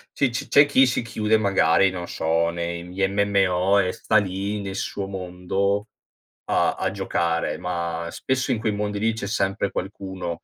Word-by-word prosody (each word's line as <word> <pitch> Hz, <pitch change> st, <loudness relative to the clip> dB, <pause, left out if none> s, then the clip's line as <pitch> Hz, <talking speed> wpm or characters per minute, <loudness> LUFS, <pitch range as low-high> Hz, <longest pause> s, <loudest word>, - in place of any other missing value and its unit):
c'è 140 Hz, -, +2 dB
ci 120 Hz, -, -4 dB
c'è 145 Hz, 0 st, +6 dB
chi 135 Hz, -2 st, +5 dB
si 125 Hz, -, 0 dB
chiude, 110 Hz, -2 st, +1 dB
magari, 100 Hz, -1 st, +3 dB
non 90 Hz, -2 st, -6 dB
so 80 Hz, +1 st, 0 dB
nei, 85 Hz, 0 st, -4 dB
mhmm, 90 Hz, -, -11 dB
gli 95 Hz, +1 st, +1 dB
MMO 100 Hz, -1 st, +2 dB
e 90 Hz, -2 st, +1 dB
sta 110 Hz, -, -2 dB
lì 100 Hz, +1 st, -1 dB
nel 95 Hz, -1 st, -5 dB
suo 100 Hz, 0 st, -3 dB
mondo, 95 Hz, +2 st, -2 dB, 0.6 s
a -, -, +1 dB
a -, -, -1 dB
giocare, 85 Hz, -1 st, -1 dB
ma 85 Hz, -1 st, -3 dB
spesso 130 Hz, 0 st, -1 dB
in 115 Hz, -, 0 dB
quei 110 Hz, 0 st, 0 dB
mondi 105 Hz, 0 st, -2 dB
lì 115 Hz, +1 st, +1 dB
c'è 110 Hz, -2 st, -5 dB
sempre 100 Hz, -1 st, -1 dB
qualcuno, 95 Hz, -2 st, -5 dB
95 Hz, 180 wpm, -24 LUFS, 90-105 Hz, 0.6 s, c'è